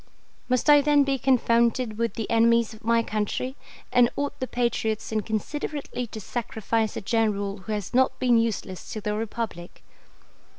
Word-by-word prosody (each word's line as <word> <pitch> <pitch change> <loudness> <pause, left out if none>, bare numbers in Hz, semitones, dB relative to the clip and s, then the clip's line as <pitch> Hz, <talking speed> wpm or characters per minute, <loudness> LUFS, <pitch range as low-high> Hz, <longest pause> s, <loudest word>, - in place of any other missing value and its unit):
Must 255 +3 +1
I 295 -1 +8
then 290 0 +4
be 275 -1 0
confounded 235 -2 +2
with 230 0 -1
the 225 -3 -3
enemies 230 0 +3
of 220 - -15
my 230 +1 +3
country 215 +5 -2 0.4
and 245 -1 +5
ought 285 0 -3
the 255 - -2
patriots 225 -3 -1
inconsiderately 240 +4 -3
to 220 - -8
sacrifice 220 0 -2
a - - -3
general 205 -2 0
who 205 +3 -7
has 205 -3 -4
not 260 +1 +3
been 245 -2 +3
useless 210 -5 -3
to 215 - -5
the 210 +1 -2
Republic? 215 -5 -5
230 Hz, 160 wpm, -25 LUFS, 215-250 Hz, 0.4 s, I